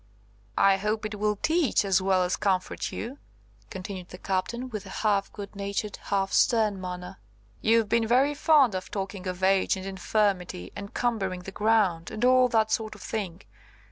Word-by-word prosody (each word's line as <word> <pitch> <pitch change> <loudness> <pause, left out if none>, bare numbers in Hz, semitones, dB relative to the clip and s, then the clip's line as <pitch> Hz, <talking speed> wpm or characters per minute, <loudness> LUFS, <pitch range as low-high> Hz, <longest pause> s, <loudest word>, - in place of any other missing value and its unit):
"I 195 -1 +5
hope 210 +2 -2
it 210 -1 -5
will 210 0 +1
teach 310 - +1
as 190 -1 +3
well 190 -1 +2
as 180 0 0
comfort 190 -2 -1
you," 250 +6 -6 0.5
continued 185 -1 -7
the 180 - -9
Captain, 200 +7 -2
with 215 -5 -6
a 190 - -6
half 200 -2 +2
good 200 0 -9
natured, 200 +1 -3
half 195 -1 0
stern 215 -4 +3
manner. 180 - -6 0.4
"You've 225 0 +3
been 230 +1 +2
very 265 +5 +3
fond 290 -6 +4
of 185 0 -4
talking 195 -1 -5
of 180 0 -4
age 190 0 +3
and 190 - -7
infirmity, 190 - -1
and 200 0 -7
'cumbering 195 -7 -1
the 190 - -8
ground,' 205 -6 +2
and 220 +3 -1
all 255 0 +6
that 220 -2 +2
sort 215 -1 -1
of 205 - -14
thing. 195 -5 -4
200 Hz, 175 wpm, -27 LUFS, 190-220 Hz, 0.5 s, all